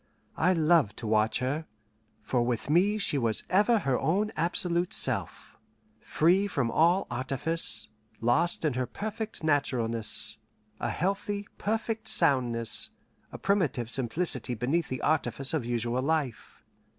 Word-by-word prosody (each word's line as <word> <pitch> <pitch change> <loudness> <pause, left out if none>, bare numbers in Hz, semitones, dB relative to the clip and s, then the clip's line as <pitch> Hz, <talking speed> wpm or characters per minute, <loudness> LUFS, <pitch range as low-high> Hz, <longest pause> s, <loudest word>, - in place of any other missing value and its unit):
I 180 +3 +2
loved 160 - +2
to 120 - -7
watch 110 0 +2
her, 145 +5 -2 0.6
for 125 - 0
with 120 +3 -2
me 195 +6 +3
she 150 -8 0
was 115 -3 +1
ever 210 +5 +4
her 135 - 0
own 205 +6 0
absolute 170 +1 -1
self, - - -2 0.4
free 185 +6 +2
from 135 -11 -1
all 175 +4 +3
artifice, 130 -3 +2 0.3
lost 125 +9 +2
in 150 - +1
her 125 0 -2
perfect 220 - -5
naturalness: 120 -7 +1 0.4
a - - -2
healthy, 200 +2 -2
perfect 220 +1 -2
soundness, 120 -4 +1 0.4
a - - -7
primitive 155 - 0
simplicity 130 -1 0
beneath 140 +9 -1
the 130 - -4
artifice 145 -3 0
of 150 -7 -1
usual 120 +1 -1
life. 145 -4 -3
150 Hz, 130 wpm, -28 LUFS, 120-180 Hz, 0.6 s, ever